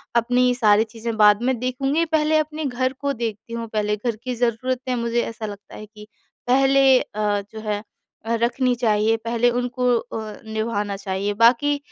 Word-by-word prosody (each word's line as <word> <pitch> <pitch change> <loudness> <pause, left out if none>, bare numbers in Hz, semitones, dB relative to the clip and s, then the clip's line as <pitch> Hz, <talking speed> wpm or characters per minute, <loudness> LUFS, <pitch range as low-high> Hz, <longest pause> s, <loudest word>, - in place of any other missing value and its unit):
अपनी 250 +1 +3
सारी 215 -3 +4
चीज़ें 225 +1 -6
बाद 210 0 +5
में 260 0 +1
देखूँगी 270 +5 0
पहले 315 -1 +2
अपने 310 0 -2
घर 255 0 -1
को 280 0 -1
देखती 230 -2 -5
हूँ 230 0 -4
पहले, 210 0 0
घर 230 +1 -2
की 250 +3 -5
ज़रूरतें 250 +2 -1
मुझे 235 0 0
ऐसा 225 -1 -5
लगता 205 -1 -9
है 215 - -9
कि 210 0 -14 0.4
पहले 270 0 +5
अ, 205 -1 -2
जो 220 - -8
है 210 -1 -2 0.5
अ, 230 +1 0
रखनी 250 +1 +1
चाहिए। 220 -1 +2
पहले 235 +1 +2
उनको 245 +1 -2
अ, 220 -2 -6
निभाना 220 -2 -2
चाहिए, 195 +1 -2
बाकी 240 +7 +3
235 Hz, 170 wpm, -22 LUFS, 215-255 Hz, 0.5 s, बाद